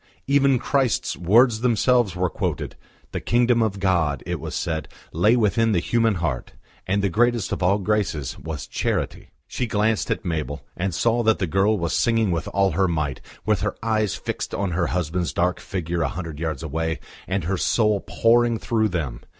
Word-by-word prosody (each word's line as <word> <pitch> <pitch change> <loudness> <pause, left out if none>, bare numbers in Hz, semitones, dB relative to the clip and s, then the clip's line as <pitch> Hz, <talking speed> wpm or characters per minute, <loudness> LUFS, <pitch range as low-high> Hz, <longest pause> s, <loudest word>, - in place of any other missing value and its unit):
Even 140 -1 +4
Christ's, 135 0 0
words 110 +5 +4
themselves 120 -3 +2
were 90 0 +1
quoted. - - -3 0.4
The - - -4
kingdom 120 0 +3
of 105 -3 0
God, 85 -8 +1
it - - -3
was - - -6
said, 80 -3 -2 0.3
lay 105 +9 +4
within 115 0 +2
the 90 - +3
human 115 +3 +1
heart, 75 -8 -3 0.3
and 100 +2 +1
the - - +3
greatest 120 +3 +1
of - - -2
all 95 +3 +3
graces 100 -9 -1
was 80 -3 -6
Charity. - - -2 0.2
She 125 - -3
glanced 110 0 +1
at - - -2
Mabel, 75 -5 -3
and 90 -1 -2
saw 115 +6 +2
that 110 -1 +3
the 95 - 0
girl 95 +5 +2
was 85 -3 -2
singing 115 -4 +2
with 85 -2 -2
all 100 -1 +2
her 95 0 +2
might, 75 -5 -2 0.2
with 105 -3 +1
her 105 - -1
eyes 110 -3 +1
fixed - - -4
on 100 -2 -1
her 85 0 0
husband's 90 0 -1
dark 90 +1 0
figure 85 -2 -3
a 75 - +2
hundred 80 -3 -6
yards 80 -2 -3
away, 80 +1 -2 0.3
and 95 -1 -1
her 95 +5 -1
soul 105 +2 +2
pouring 115 +3 +2
through 110 -1 +1
them. 75 -10 -3
95 Hz, 185 wpm, -23 LUFS, 85-115 Hz, 0.4 s, Even